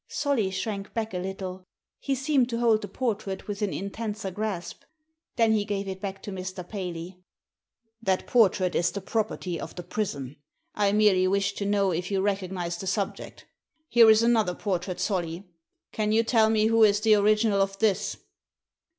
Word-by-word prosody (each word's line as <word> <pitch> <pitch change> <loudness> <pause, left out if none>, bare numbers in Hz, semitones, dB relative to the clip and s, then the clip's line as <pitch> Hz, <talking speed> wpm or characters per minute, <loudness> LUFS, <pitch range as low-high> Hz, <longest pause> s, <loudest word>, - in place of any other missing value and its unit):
Solly 265 -9 0
shrank 195 +1 -4
back 225 -3 -2
a 180 - -2
little. 185 0 -6 0.3
He 275 - -1
seemed 265 -1 +1
to 230 - -2
hold 230 -2 +3
the 205 - -5
portrait 205 -3 -3
with 205 0 -5
an 205 -2 0
intenser 205 0 -4
grasp. 200 -3 -4 0.5
Then 230 -2 +3
he 215 -2 +2
gave 200 -1 -3
it 190 -1 -6
back 195 -1 -5
to 205 - -6
Mr. 185 -1 -6
Paley. 180 -2 -6 0.4
" 225 -1 -53
That 190 -4 0
portrait 190 -6 +3
is 175 - +2
the 200 - -5
property 190 -4 -2
of - - -7
the 175 - -6
prison. 150 -8 -4 0.4
I 205 -1 +2
merely 205 -3 +4
wished 200 +1 0
to 200 - -2
know 200 -2 +2
if 175 +2 -2
you 195 -1 0
recognised 185 -3 -2
the 190 - -6
subject 200 +1 -3 0.4
Here 230 -2 +7
is 220 +1 +6
another 220 -6 +2
portrait, 185 -2 -3
Solly. 180 -2 -2 0.4
Can 215 -1 -1
you 225 +1 +4
tell 225 -1 +3
me 215 -1 +3
who 225 0 +4
is 205 -1 +4
the 220 0 +5
original 210 0 +3
of 195 0 -1
this?" 210 -2 0
200 Hz, 180 wpm, -26 LUFS, 185-220 Hz, 0.5 s, Here